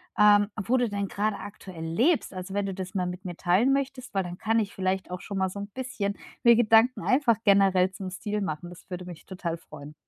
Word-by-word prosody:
ähm, 205 -1 +6
wo 255 +6 +2
du 245 -1 +2
denn 200 -1 -2
gerade 205 +1 -1
aktuell 185 -5 -9
lebst? 230 - +1
Also, 185 +1 -6
wenn 200 0 0
du 195 - -4
das 185 0 -6
mal 180 -2 0
mit 180 +2 -7
mir 175 -2 -5
teilen 190 +11 +3
möchtest, 270 -1 -3
weil 195 - +2
dann 175 0 -6
kann 225 +1 +1
ich 200 -2 -2
vielleicht 190 0 -2
auch 180 0 -5
schon 200 -1 -4
mal 190 0 +1
so 195 - -9
‘n 200 - -5
bisschen 210 -4 -3 0.3
mir 235 -1 +8
Gedanken 230 +2 +4
einfach 255 -5 +3
generell 195 -2 +5
zum 190 -1 -7
Stil 210 +2 -3
machen. 175 -1 -4
Das 175 +1 -14
würde 180 0 -5
mich 175 -3 -10
total 175 -3 -4
freuen. 150 -2 -12
195 Hz, 230 wpm, -27 LUFS, 180-220 Hz, 0.3 s, mir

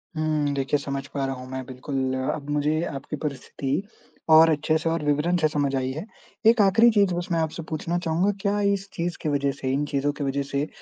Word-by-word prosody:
हुँ, 155 -2 0
देखिए 135 +1 +1
समझ 140 0 -4
पा 140 -1 -1
रहा 135 0 -2
हूँ 125 0 -9
मैं 130 0 -4
बिल्कुल, 130 0 -3 0.2
अब 145 -1 -9
मुझे 150 +2 +1
आपकी 135 +2 -5
परिस्थिति 140 +1 -2 0.5
और 160 +1 +8
अच्छे 155 0 +2
से 165 - -1
और 165 -1 -1
विवरण 150 +4 +2
से 155 - +3
समझ 145 -3 0
आई 130 0 -1
है। 155 +7 -5 0.4
एक 230 -1 +6
आखिरी 205 +4 +6
चीज़ 200 -4 +3
बस 175 0 -3
मैं 165 - +2
आपसे 160 +1 -2
पूछना 165 +2 -2
चाहूँगा, 175 +3 +1
क्या 205 0 +1
इस 195 0 -2
चीज़ 170 +1 -3
के 155 - -1
वजह 140 -1 +1
से, 135 -1 -3
इन 145 +2 0
चीज़ों 145 0 0
के 145 - -5
वजह 140 0 -1
से 140 +1 -2
150 Hz, 220 wpm, -25 LUFS, 140-165 Hz, 0.5 s, और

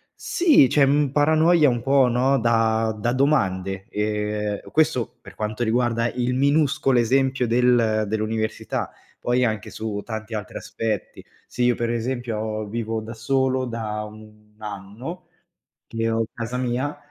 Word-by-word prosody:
sì, 315 - +4
c'è 145 - +4
un 140 0 +3
paranoia 155 +2 +4
un 120 -2 -1
po', 135 0 +4
no, 130 +3 +2
da 115 -1 +1
da 115 +3 0
domande. 95 -9 0
Ehm, 105 0 -2
questo, 155 -6 +1
per - - -13
quanto 110 +2 -3
riguarda 115 0 +1
il 125 0 -1
minuscolo 140 -1 +2
esempio 130 +2 +2
del 115 -2 +3
dell'università, 110 +1 -2 0.3
poi 125 +1 +1
anche 110 -3 -1
su 105 -2 -4
tanti 110 0 -6
altri 105 -1 -6
aspetti. 110 -3 -4 0.2
Se 125 - -2
io 120 0 +3
per 120 -1 -2
esempio 115 -3 -3
vivo 110 0 -3
da 110 +1 -8
solo 130 +3 0
da 110 -3 -4
1 105 0 -15
anno, 110 - -8 0.6
che 115 0 -2
ho 115 0 +1
casa 115 +2 -5
mia, 125 +3 -2
115 Hz, 140 wpm, -23 LUFS, 110-130 Hz, 0.6 s, sì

